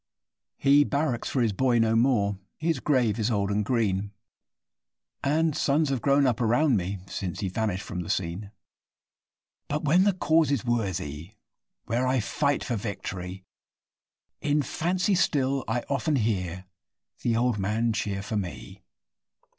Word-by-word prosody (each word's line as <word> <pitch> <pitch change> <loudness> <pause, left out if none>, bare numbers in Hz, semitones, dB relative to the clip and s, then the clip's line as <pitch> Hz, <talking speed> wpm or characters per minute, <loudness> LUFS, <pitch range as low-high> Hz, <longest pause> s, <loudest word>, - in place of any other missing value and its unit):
He 140 +1 +5
barracks 140 -4 -1
for 130 - +1
his 110 -3 +1
boy 125 +2 +2
no 115 -1 +3
more 110 -5 +2 0.2
his 160 -3 0
grave 120 -6 +1
is 110 +1 +1
old 100 -3 0
and 105 +1 +1
green, 105 -3 0 1.1
And 155 +2 +2
sons 150 +1 +2
have 135 -4 -1
grown 140 0 +3
up 125 -2 +1
round 120 +4 +3
me 95 0 -2
since 95 -2 -5
he 95 - -1
vanished 100 -1 -2
from 95 - -5
the 90 - -5
scene; 95 +3 -2 1.2
But, 150 +2 -2
when 165 +6 +4
the 205 - +4
cause 160 -3 +2
is 140 -6 0
worthy 95 - -2 0.5
where 120 +3 0
I 130 0 +2
fight 140 +7 0
for 120 - -2
victory, 95 -3 -6 1.0
In 145 0 +1
fancy 180 +7 0
still 140 -6 +1
I 120 +2 -1
often 145 +2 0
hear 95 -6 -1 0.6
the 115 -2 +1
old 120 -3 +1
man 110 +4 0
cheer 100 -3 -2
for 110 0 -3
me. 95 -4 -6
115 Hz, 150 wpm, -27 LUFS, 100-140 Hz, 1.2 s, He